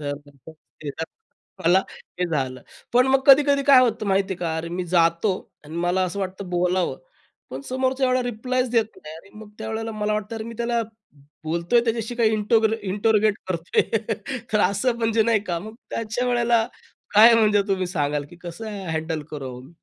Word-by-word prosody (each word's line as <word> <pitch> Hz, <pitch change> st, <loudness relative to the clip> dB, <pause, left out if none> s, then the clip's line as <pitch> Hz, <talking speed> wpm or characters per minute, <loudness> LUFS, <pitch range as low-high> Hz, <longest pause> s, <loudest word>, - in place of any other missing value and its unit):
तर 145 Hz, -1 st, -3 dB, 1.5 s
मला 180 Hz, +3 st, +5 dB, 0.4 s
हे 180 Hz, -, +2 dB
झालं. 130 Hz, -4 st, -2 dB, 0.3 s
पण 250 Hz, +2 st, +5 dB
मग 270 Hz, 0 st, +3 dB
कधी-कधी 280 Hz, 0 st, +6 dB
काय 275 Hz, -3 st, +8 dB
होतं 225 Hz, -4 st, +1 dB
माहिती 195 Hz, 0 st, +1 dB
आहे -, -, -13 dB
का? 165 Hz, -2 st, -2 dB
अरे, 165 Hz, +1 st, -4 dB
मी 180 Hz, +1 st, -3 dB
जातो 170 Hz, +2 st, +2 dB, 0.3 s
आणि 155 Hz, +3 st, -8 dB
मला 175 Hz, +2 st, +1 dB
असं 185 Hz, +2 st, -4 dB
वाटतं 190 Hz, 0 st, -5 dB
बोलावं. 180 Hz, 0 st, 0 dB, 0.5 s
पण -, -, -5 dB
समोरचा 260 Hz, +1 st, 0 dB
एवढा 255 Hz, 0 st, +2 dB
रिप्लायच 250 Hz, +1 st, -2 dB
देत 230 Hz, -2 st, +3 dB, 0.2 s
नाही 155 Hz, +1 st, -9 dB
आणि 180 Hz, +5 st, -15 dB
मग 215 Hz, -1 st, -11 dB
त्यावेळेला 220 Hz, +1 st, -4 dB
मला 215 Hz, 0 st, -1 dB
वाटतं 215 Hz, +1 st, -3 dB
अरे, 220 Hz, -, -5 dB
मी 230 Hz, +1 st, -7 dB
त्याला 235 Hz, 0 st, 0 dB, 0.6 s
बोलतो 170 Hz, +7 st, 0 dB
आहे, 235 Hz, -, +4 dB
त्याच्याशी 225 Hz, 0 st, -2 dB
काही 230 Hz, -2 st, +3 dB
इंटो 215 Hz, +1 st, +2 dB, 0.2 s
इंटेरोगेट 210 Hz, +2 st, +2 dB
करतो 170 Hz, -2 st, -3 dB
आहे, 225 Hz, -, 0 dB, 0.5 s
तर 215 Hz, -, +3 dB
असं 205 Hz, +6 st, +1 dB
म्हणजे 225 Hz, -1 st, +2 dB
नाही 225 Hz, -2 st, +2 dB
का? 170 Hz, -2 st, -1 dB
मग 215 Hz, +5 st, -9 dB, 0.2 s
त्या 230 Hz, +2 st, -2 dB
वेळेला 235 Hz, -2 st, +2 dB, 0.5 s
काय 225 Hz, +3 st, +9 dB
म्हणजे 210 Hz, -2 st, +4 dB
तुम्ही 190 Hz, -1 st, 0 dB
सांगाल 145 Hz, -4 st, -1 dB
की 175 Hz, -, -13 dB
कसं 195 Hz, +3 st, -7 dB
हँडल 160 Hz, -1 st, -2 dB
करावं? 130 Hz, -2 st, -7 dB
210 Hz, 175 wpm, -23 LUFS, 175-230 Hz, 1.5 s, काय